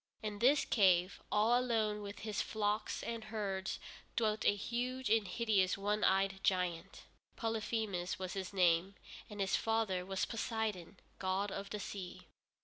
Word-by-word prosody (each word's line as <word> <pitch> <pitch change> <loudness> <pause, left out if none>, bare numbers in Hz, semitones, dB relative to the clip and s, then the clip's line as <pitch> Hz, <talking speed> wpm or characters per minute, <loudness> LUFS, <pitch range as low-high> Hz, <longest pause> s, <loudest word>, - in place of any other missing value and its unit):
In 210 -1 -4
this 275 +5 +5
cave, 185 -3 +3
all 220 +3 +4
alone 220 -4 0
with 205 -1 -7
his 215 -1 -1
flocks 210 0 -1
and 230 -1 -4
herds, 205 -3 -3 0.4
dwelt 215 -2 +1
a 205 - +5
huge 245 +3 -2
and 220 -3 +4
hideous 195 -3 +2
one 205 +2 0
eyed 195 0 +3
giant. 180 -3 -1 0.3
Polyphemus 220 -5 -2
was 185 -1 -4
his 190 -2 -4
name, 180 0 +3 0.3
and 210 -1 -8
his 195 -1 +2
father 220 -5 0
was 190 0 -1
Poseidon, 220 -6 -3 0.2
god 190 +2 0
of 200 +1 -5
the 210 - -4
sea. 190 -2 -6
205 Hz, 145 wpm, -35 LUFS, 190-220 Hz, 0.4 s, this